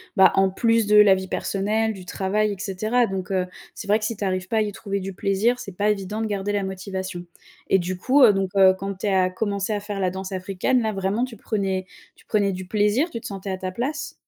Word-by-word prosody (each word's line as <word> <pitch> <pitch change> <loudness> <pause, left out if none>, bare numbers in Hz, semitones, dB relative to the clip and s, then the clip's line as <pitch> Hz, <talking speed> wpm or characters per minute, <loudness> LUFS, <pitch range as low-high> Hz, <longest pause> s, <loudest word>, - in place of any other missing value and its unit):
bah, 190 -2 +7
en 195 0 +4
plus 225 +2 +2
de 210 - +4
la 210 -2 +8
vie 190 0 -2
personnelle, 215 +4 0
du 190 -3 -9
travail 205 +3 0
et - - -6
cetera. 215 +6 +1
Donc, 190 -2 -4
heu, 185 -1 +1 0.3
c'est - - -8
vrai 215 +2 +4
que 215 - -3
si 230 - -2
tu 200 - -6
arrives 185 -1 -1
pas 225 - -1
à - - +4
y 210 -1 -1
trouver 200 -1 -4
du 195 +1 -5
plaisir, 205 +7 +1
c'est 200 -8 -8
pas 205 +3 +1
évident 210 +1 -2
de 220 - -1
garder 205 0 -2
la 200 -1 0
motivation. 190 -2 -5 0.4
Et 195 - +5
du 180 0 -3
coup, 265 +7 +4
heu, 220 - +9
donc 195 -2 -1
heu, 190 -1 +7
quand 195 0 -3
tu 210 - -2
es 195 - +2
a 185 -1 +3
commencé 200 +1 -2
à 205 - -2
faire 205 -1 -5
la 185 -1 +1
danse 190 +1 -6
africaine, 190 +6 0
là, 220 -1 -1
vraiment 195 +5 0
tu 250 -3 -10
prenais 195 -3 -2 0.3
tu - - -23
prenais 205 -2 +1
du 185 0 -6
plaisir, 210 - +2
tu 230 - -5
te 245 - -8
sentais 195 -1 -6
à 185 - -2
ta 185 0 -5
place? 285 +6 -3
200 Hz, 260 wpm, -23 LUFS, 190-215 Hz, 0.4 s, heu